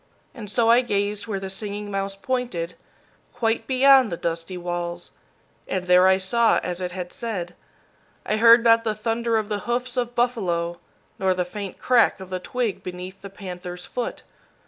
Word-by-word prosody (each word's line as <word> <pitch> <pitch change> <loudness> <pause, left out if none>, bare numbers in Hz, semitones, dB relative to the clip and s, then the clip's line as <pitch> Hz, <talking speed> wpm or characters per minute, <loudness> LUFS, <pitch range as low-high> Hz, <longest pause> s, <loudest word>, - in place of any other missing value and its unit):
And 215 -5 -8
so 230 +2 +2
I 235 +2 +6
gazed 205 -2 -1
where 200 -3 -2
the 195 - -5
Singing 205 +1 -5
Mouse 195 0 -2
pointed, 200 -6 -3 0.6
quite 230 -1 0
beyond 265 -2 +5
the 170 - -3
dusty 170 +2 -3
walls, 175 0 -4 0.6
and 185 -1 -2
there 180 +1 +6
I 190 0 +5
saw 225 +5 +3
as 180 0 -4
it 180 -1 -3
had 180 -1 -6
said. 220 -10 -4 0.7
I 215 - 0
heard 230 +1 +7
not 230 -1 +5
the 220 -2 -1
thunder 230 +1 0
of 215 -1 -1
the 210 -1 -2
hoofs 245 +1 -1
of 240 -1 -1
buffalo, 175 -9 0 0.4
nor 190 -1 +2
the 180 -1 -1
faint 200 +1 -7
crack 240 -6 +3
of 190 -1 -10
the 185 - -2
twig 230 +2 -2
beneath 180 +1 -8
the 200 - -8
panther's 180 -2 -7
foot. 245 - -4
200 Hz, 175 wpm, -24 LUFS, 180-235 Hz, 0.7 s, heard